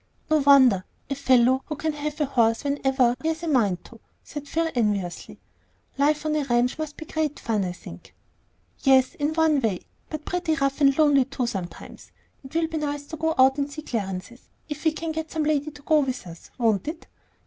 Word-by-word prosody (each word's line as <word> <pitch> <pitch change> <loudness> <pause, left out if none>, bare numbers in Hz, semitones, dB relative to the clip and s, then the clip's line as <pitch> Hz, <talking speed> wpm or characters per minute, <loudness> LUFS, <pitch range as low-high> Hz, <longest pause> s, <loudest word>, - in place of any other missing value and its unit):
"No 310 - +5
wonder; 265 -9 +6 0.3
a - - +3
fellow 260 -1 +3
who 305 - -3
can 315 +1 -2
have 300 +1 -5
a 300 - +2
horse 230 -4 +2
whenever 270 -3 +2
he 320 - -2
has 320 +1 -2
a - - -3
mind 210 - +1
to," 230 - -14 0.2
said 290 -1 -8
Phil, 330 +3 0
enviously. 205 -7 -2 0.6
"Life 300 +2 +1
on 305 0 0
a 300 - +1
ranch 245 +2 +1
must 310 -1 -5
be 320 - -8
great 310 -2 -2
fun, 215 -3 -1
I 180 - -2
think." 85 - -12 0.6
"Yes; 265 +1 +4
in 310 -3 -2
one 320 -3 +3
way, 215 -6 -1 0.3
but 310 -1 -6
pretty 355 -3 -1
rough 275 -1 -1
and 275 -1 +5
lonely 290 -4 +5
too, 270 -1 -3
sometimes. 190 -7 -7 0.3
It 265 +4 -12
will 330 0 +2
be 320 0 -4
nice 290 -1 -3
to 320 - -5
go 320 +1 -1
out 265 +2 +5
and 280 0 -2
see 310 +1 -7
Clarence's, 210 0 -5 0.2
if 300 +1 -7
we 320 - +5
can 320 +1 -4
get 315 0 -4
some 315 -1 -2
lady 300 -1 0
to 290 -1 -15
go 310 0 +4
with 260 -6 -2
us, 165 -1 -12
won't 225 -4 +1
it?" 320 +2 -5
280 Hz, 210 wpm, -25 LUFS, 240-310 Hz, 0.6 s, wonder